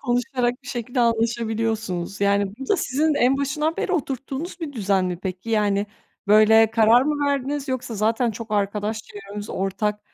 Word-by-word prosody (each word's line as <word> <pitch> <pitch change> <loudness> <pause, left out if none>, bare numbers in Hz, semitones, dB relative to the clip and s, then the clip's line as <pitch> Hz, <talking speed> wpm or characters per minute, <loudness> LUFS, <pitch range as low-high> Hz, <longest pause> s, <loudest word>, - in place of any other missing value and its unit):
konuşarak 245 0 -1
bir 250 - -12
şekilde 245 +1 -2
anlaşabiliyorsunuz. 225 -5 -1
Yani 200 -1 +2
bu 270 - -7
da 405 - +3
sizin 300 +3 +1
en 260 0 +3
başından 300 +3 -1
beri 375 - -2
oturttuğunuz 280 +3 -3
bir 310 -3 -5
düzen 195 -6 +1
mi 180 -1 -3
peki? 185 +3 -5
Yani 205 -2 +1 0.4
böyle 215 +1 +6
karar 225 +2 +5
mı 290 0 0
verdiniz 280 0 -1
yoksa 255 -3 -3
zaten 225 +3 +1
çok 225 +1 -8
arkadaş 210 +1 -1
çevremiz 205 0 -9
ortak 200 +2 -2
225 Hz, 160 wpm, -23 LUFS, 205-265 Hz, 0.4 s, böyle